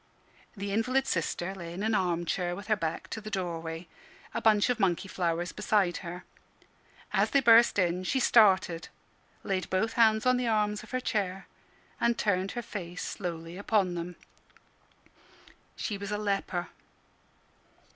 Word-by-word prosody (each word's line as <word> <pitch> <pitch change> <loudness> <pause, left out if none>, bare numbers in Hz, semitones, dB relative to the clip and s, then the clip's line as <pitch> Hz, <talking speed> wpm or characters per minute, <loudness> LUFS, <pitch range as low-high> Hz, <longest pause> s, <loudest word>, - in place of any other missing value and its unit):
The 200 0 -4
invalid 255 +6 +1
sister 175 0 -1
lay 170 -3 -7
in 190 +4 -4
an 220 +1 +1
arm 175 -4 +1
chair 175 +1 -1
with 200 - -8
her 215 - +4
back 165 -5 -3
to 220 - -5
the 215 - -7
doorway, 170 -3 -4 0.5
a - - -2
bunch 215 -2 +4
of 245 - -2
monkey 190 -1 +1
flowers 175 -1 -1
beside 195 -5 +1
her. 175 0 -7 0.9
As - - +3
they 280 - +4
burst 235 -3 +6
in, 180 -1 +1
she 260 +9 0
started, 190 -8 +4 0.6
laid 190 -3 -2
both 215 +4 0
hands 220 -1 +4
on 255 0 +4
the 250 -1 -1
arms 210 -2 +1
of 215 - -13
her 255 0 -2
chair, 195 -5 -2 0.5
and 235 0 +2
turned 195 -2 0
her 240 - -4
face 180 -5 -6
slowly 170 -2 -5
upon 200 -3 +1
them. 175 +1 -5 1.6
She 205 -3 -3
was 200 0 -5
a 210 - 0
leper! 195 -4 -2
195 Hz, 155 wpm, -29 LUFS, 175-215 Hz, 1.6 s, burst